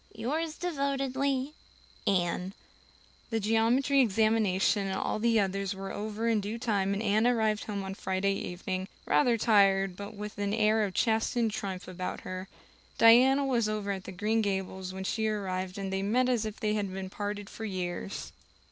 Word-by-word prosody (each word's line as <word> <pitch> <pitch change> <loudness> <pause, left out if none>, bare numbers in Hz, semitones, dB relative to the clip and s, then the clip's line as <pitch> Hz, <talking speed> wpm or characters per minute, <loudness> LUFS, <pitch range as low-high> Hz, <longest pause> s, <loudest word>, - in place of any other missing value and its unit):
"Yours 305 +8 -2
devotedly, 275 -3 -1 0.5
"Anne" 180 0 0 0.7
The 225 -2 0
geometry 230 +6 +3
examination 215 -3 +2
and 190 - -2
all - - -1
the 230 0 +3
others 195 0 -1
were 195 0 -6
over 215 +2 -3
in 225 -2 +2
due 210 +3 -4
time 200 -5 0
and 205 - -2
Anne 215 +2 +3
arrived 220 -3 +1
home 200 -2 -3
on 190 0 -5
Friday 190 0 0
evening, 185 0 -4 0.2
rather 245 -5 +3
tired 195 -4 +4
but 200 +2 -8
with 210 0 -7
an 205 +1 0
air 220 0 +3
of 190 - -6
chastened 225 0 +1
triumph 195 -4 -5
about 185 0 -5
her. 185 +1 -6 0.5
Diana 255 +5 +6
was 235 -5 +1
over 210 -2 -2
at 190 -1 -6
Green 220 +2 +1
Gables 190 -2 -2
when 190 0 -6
she 220 +3 -1
arrived 190 -3 -2
and 195 -1 -3
they 195 - 0
met 245 +6 +2
as 235 -3 +1
if 215 - -7
they 210 -1 0
had 205 -3 -1
been 190 0 -6
parted 205 0 -4
for 225 - -9
years. 185 -1 -4
210 Hz, 170 wpm, -29 LUFS, 195-230 Hz, 0.7 s, Diana